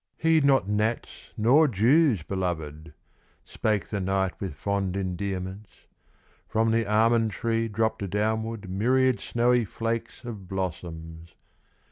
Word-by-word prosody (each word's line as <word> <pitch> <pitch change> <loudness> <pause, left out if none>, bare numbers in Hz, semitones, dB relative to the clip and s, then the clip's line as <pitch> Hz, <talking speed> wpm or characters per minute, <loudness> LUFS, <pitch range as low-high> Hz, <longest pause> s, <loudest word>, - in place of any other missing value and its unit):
"Heed 160 -2 +3
not 135 -7 +3
gnats 105 +3 -2
nor 135 +9 +5
Jews, 120 - +3
belovèd," 80 -4 -4 0.5
Spake 105 -5 -1
the 100 - -2
knight 95 0 0
with 95 -7 -4
fond 100 +2 -2
endearments. 95 +1 -5 0.6
From 110 +1 +1
the 115 -1 +1
almond 115 +1 +3
tree 115 +1 -1
dropped 110 -2 -1
downward 110 +1 -2
Myriad 125 +7 +2
snowy 120 0 +2
flakes 115 +3 -4
of 105 -6 -7
blossoms. 85 -3 -6
105 Hz, 115 wpm, -26 LUFS, 95-115 Hz, 0.6 s, nor